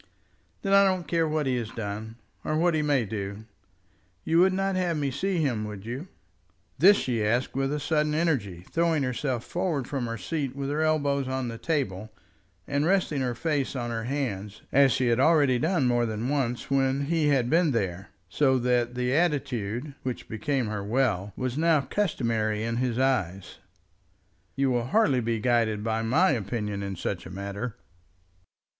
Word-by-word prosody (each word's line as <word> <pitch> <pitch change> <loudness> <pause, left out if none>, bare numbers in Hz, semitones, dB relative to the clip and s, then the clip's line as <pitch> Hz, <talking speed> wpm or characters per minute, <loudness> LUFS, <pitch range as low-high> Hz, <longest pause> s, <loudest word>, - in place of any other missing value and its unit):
"Then 195 -1 +1
I 200 0 +7
don't 185 -4 +1
care 165 0 +1
what 155 -1 0
he 130 -1 +1
has 115 -3 -3
done, 110 -1 -5 0.3
or 155 - -1
what 170 +1 +3
he 155 - +1
may 145 -5 +2
do. 100 0 -5 0.8
You 165 +1 +2
would 190 +2 +5
not 195 0 0
have 175 -3 0
me 140 -2 -1
see 190 +7 -1
him, 130 -9 0
would 105 -1 -8
you?" 130 +9 -5 0.7
This 200 +5 +7
she 120 -4 -1
asked 120 +5 0
with 135 0 0
a 150 - -1
sudden 150 +1 0
energy, 110 - -1
throwing 165 -3 +2
herself 125 -1 -2
forward 170 -8 -2
from 135 -4 -2
her 115 0 -4
seat 135 - -3
with 140 0 -3
her 150 +2 0
elbows 145 -3 +1
on 130 -2 -2
the 115 0 -7
table, 110 - -2 0.6
and 140 +1 0
resting 170 -5 +1
her 125 -2 -1
face 145 0 -1
on 120 -2 -3
her 115 -1 -3
hands, 105 -7 -3
as 140 0 +5
she 125 - +1
had 115 +1 +2
already 140 -4 +4
done 160 -1 +1
more 120 -1 +2
than 110 +3 -3
once 135 -1 -1
when 135 0 +2
he 160 0 +1
had 135 -5 +2
been 165 +4 +3
there; 100 -6 -2 0.2
so 135 -3 +2
that 125 -1 +1
the 125 +1 0
attitude, 140 - -1
which 125 -2 -5
became 135 +3 -1
her 105 -2 -3
well, 105 -3 0
was 130 +2 -2
now 165 -1 +4
customary 115 - -1
in 115 +1 -2
his 125 -2 -1
eyes. 100 -9 -1 1.0
"You 135 -1 +1
will 120 -1 0
hardly 150 - +3
be 115 -1 -1
guided 110 -2 +1
by 110 0 0
my 150 +12 +3
opinion 105 -3 -2
in 100 -1 -4
such 90 +1 -4
a - - -9
matter." 100 +5 -5
130 Hz, 180 wpm, -27 LUFS, 115-150 Hz, 1.0 s, I